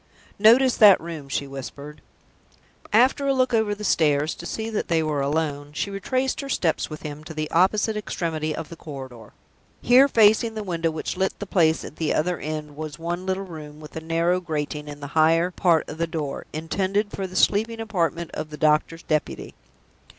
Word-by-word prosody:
"Notice 240 +5 +6
that 205 -3 +8
room," 160 -4 -8
she 140 - -1
whispered. 140 +2 -9 0.9
After 260 +5 +3
a 275 - +2
look 255 -1 +1
over 220 -2 +2
the 210 - -9
stairs 150 -5 +2
to - - -8
see 220 0 -4
that 220 -2 -2
they 165 -1 +2
were 150 -2 -1
alone, 145 0 -2
she 200 +7 -3
retraced 255 +8 -1
her 275 - -7
steps 170 -10 0
with 155 -1 -8
him 150 0 -7
to 160 0 -9
the 155 0 -3
opposite 205 +5 +2
extremity 160 -6 -3
of 165 - -6
the 170 - -8
corridor. 130 -8 -10 0.5
Here, 255 +3 +6
facing 225 -2 +4
the 215 - -4
window 170 -4 -1
which 160 +3 -4
lit 190 0 0
the 205 - -6
place 165 -5 +2
at - - -10
the 160 -2 0
other 175 +3 0
end, 150 -1 -5
was 155 -2 -6
one 175 +3 -4
little 190 +1 -1
room, 155 -4 -10
with 150 -1 -12
a 160 - -4
narrow 165 +2 +1
grating 150 -2 -4
in 145 0 -9
the - - -5
higher 165 +3 +3
part 170 -3 +2
of 155 - -8
the 170 - 0
door, 155 -4 -4
intended 195 +6 -1
for 195 -1 -4
the 185 - -12
sleeping 225 +4 +2
apartment 170 -6 -2
of 155 - -5
the 150 - -8
doctor's 155 +2 +1
deputy. 155 -1 -2
165 Hz, 195 wpm, -24 LUFS, 155-205 Hz, 0.9 s, that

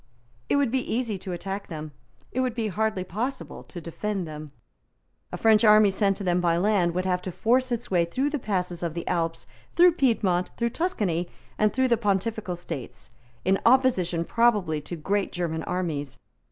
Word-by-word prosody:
It - - +3
would 280 -4 +2
be 260 0 +1
easy 225 -4 -1
to 185 - -6
attack 195 +3 -5
them. 155 -2 -7 0.4
It 255 - -2
would 255 -2 0
be 225 -3 -1
hardly 215 -1 -1
possible 240 +9 -4
to 175 - -9
defend 185 +2 -4
them. 150 -1 -8 0.8
A - - -4
French 220 -1 +4
army 215 -2 +7
sent 195 0 +1
to 205 - -6
them 180 -1 +1
by 170 -1 +2
land 180 -3 +2
would 185 +1 -1
have 180 -1 0
to 185 - -5
force 255 +7 +1
its 235 -3 -3
way 175 -2 +3
through 265 +12 -1
the 295 - -1
passes 180 -6 -2
of 170 -2 -3
the 170 - -5
Alps, 165 -1 -1 0.3
through 355 +1 +7
Piedmont, 215 - +1
through 235 0 0
Tuscany, 195 - -1 0.3
and 215 0 +4
through 260 +3 +2
the 235 -2 +3
Pontifical 205 -2 -1
States, 165 -9 -8 0.3
in 190 +1 +3
opposition 230 -10 +3
probably 205 -10 +2
to 175 - -6
great 195 +5 -1
German 165 -2 -2
armies. 160 -6 -3
195 Hz, 185 wpm, -26 LUFS, 175-230 Hz, 0.8 s, army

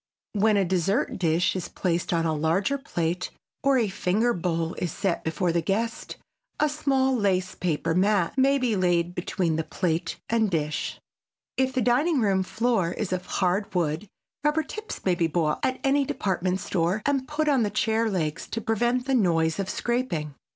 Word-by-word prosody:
When 210 0 +3
a 195 - +3
dessert 190 - 0
dish 170 +1 +2
is 185 - -3
placed 175 -2 -1
on 165 -1 +1
a 160 - +1
larger 170 - +1
plate, 175 -7 -2 0.3
or 275 -1 +3
a 230 -4 +2
finger 205 +5 +1
bowl 165 -1 -1
is 175 - -2
set 195 -2 -1
before 170 +2 0
the 170 0 +1
guest, 225 +7 -2 0.4
a 300 - +3
small 270 -3 +1
lace 190 -5 +1
paper 165 -2 -1
mat 190 0 +2
may 275 +1 +4
be 250 -5 +1
laid 175 -2 +1
between 175 -2 -1
plate 170 -3 -1
and 225 -2 +2
dish. 155 -3 -2 0.6
If 260 0 +1
the 255 -2 +1
dining 275 +6 +3
room 195 -4 +2
floor 220 -3 0
is 190 -2 -3
of 180 0 -3
hard 190 +1 0
wood 170 +3 0 0.4
rubber 300 +1 +2
tips 430 +8 -7
may 185 - +3
be 170 -1 +1
bought 160 -2 0
at 260 - 0
any 280 +1 +3
department 185 -6 -1
store 180 +5 0
and 275 -2 +1
put 305 +1 -1
on 275 -4 +3
the 210 - +1
chair 220 +2 +1
legs 165 -4 -2
to 230 - -3
prevent 240 +3 0
the 270 - 0
noise 165 -7 +2
of 195 -1 -2
scraping. 235 - -2
195 Hz, 180 wpm, -26 LUFS, 170-245 Hz, 0.6 s, may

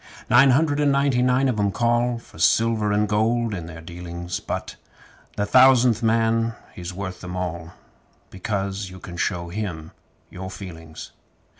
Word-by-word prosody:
Nine 130 +3 +7
hundred 145 +2 +2
and 145 -1 +3
ninety 140 -2 +2
nine 125 +2 +3
of 120 -5 -1
'em 100 -1 +2
call 120 +2 +1
For 115 - -15
silver 110 +3 +2
and 105 +1 +2
gold 110 +2 +1
in 85 -4 -5
their 80 -1 -9
dealings; 85 +1 -6
But - - -5 0.6
the 105 - 0
Thousandth 125 -1 +5
Man 115 0 +1 0.2
he's 90 0 -7
worth 95 0 -6
'em 90 0 -6
all, 85 -2 -4 0.6
Because 95 0 -3
you 95 - -11
can 85 - -9
show 85 0 -2
him 85 -5 -5 0.4
your 95 +1 -7
feelings! 85 -4 -9
105 Hz, 155 wpm, -23 LUFS, 90-120 Hz, 0.6 s, Nine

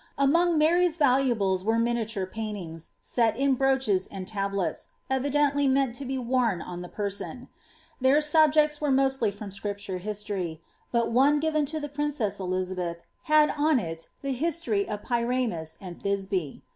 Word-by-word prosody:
Among 330 +5 +3
Mary' 340 +4 +4
talu 275 -5 +3
abies 190 -3 0
were 225 +2 +1
miniature 230 -4 0
pahitings, 185 -6 -6
set 230 -2 +1
in 275 0 +3
bnnichea 265 -8 +1
and 190 -1 -7
tablets, 195 -4 -2 0.2
evideodv 285 +1 +2
meant 265 -2 +2
to 270 +3 -6
be 265 +1 -2
worn 240 -6 +1
on 175 +2 -7
the 180 - -8
person; 205 +5 -4 0.5
their 265 +3 +5
subjects 300 0 +3
were 295 - +1
mostly 265 -4 +2
from 200 0 -8
Scrip 200 +1 -4
ture 195 -2 -5
histor}% 200 -4 -4 0.3
but 235 -1 +1
one 275 +5 +4
given 310 -1 +1
to 310 +2 -2
the 295 - -4
princess 290 -8 -2
Elizabeth 185 -2 -3 0.2
had 305 -1 +5
on 300 0 +2
it 165 -6 -5
the 275 - -1
his 320 +5 -1
tory 215 -11 -1
of 210 -1 -4
Pyramus 235 -9 -1
and 180 -3 -9
Thisbe. 195 -6 -2
235 Hz, 160 wpm, -27 LUFS, 195-280 Hz, 0.5 s, their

